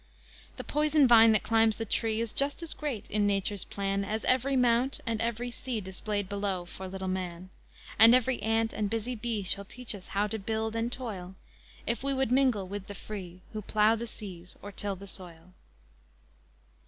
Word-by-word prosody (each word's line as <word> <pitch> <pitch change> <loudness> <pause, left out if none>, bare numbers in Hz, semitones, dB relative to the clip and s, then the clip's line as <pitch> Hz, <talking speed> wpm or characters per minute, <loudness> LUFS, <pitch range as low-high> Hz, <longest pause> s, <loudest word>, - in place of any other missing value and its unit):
The - - -5
poison 300 -1 +3
vine 225 -2 +8
that 215 - +2
climbs 225 -1 +3
the 225 - -4
tree, 220 +1 0
Is 230 -2 -2
just 280 +4 +1
as 330 - 0
great 280 -9 -4
in 205 0 +2
Nature's 200 -1 0
plan 195 0 -1
As 215 +2 -3
every 260 +2 +3
mount 250 +1 +3
and 230 -2 -1
every 235 +1 -1
sea 240 -1 -4
Displayed 205 +1 -3
below 200 -2 -2
for 190 +2 -8
little 190 0 -5
man. 185 -1 -4 0.5
And 225 +3 +9
every 255 0 +1
ant 225 0 +1
and 210 -1 -1
busy 225 +3 -2
bee 230 -3 -2
Shall 200 +2 +1
teach 250 +4 -4
us 195 -3 -9
how 200 +1 0
to 220 +1 -3
build 220 +2 -2
and 230 +1 -1
toil 195 -8 -5 0.5
If 235 +2 -1
we 275 0 0
would 265 -3 0
mingle 250 -7 +3
with 200 0 -6
the 205 - -7
free, 185 -4 -8
Who 215 - -3
plough 215 +2 +3
the 235 +1 -5
seas 185 -5 -9
or 205 - -7
till 200 0 -2
the 195 +2 -10
soil. 180 -2 -7
215 Hz, 190 wpm, -29 LUFS, 195-235 Hz, 0.5 s, And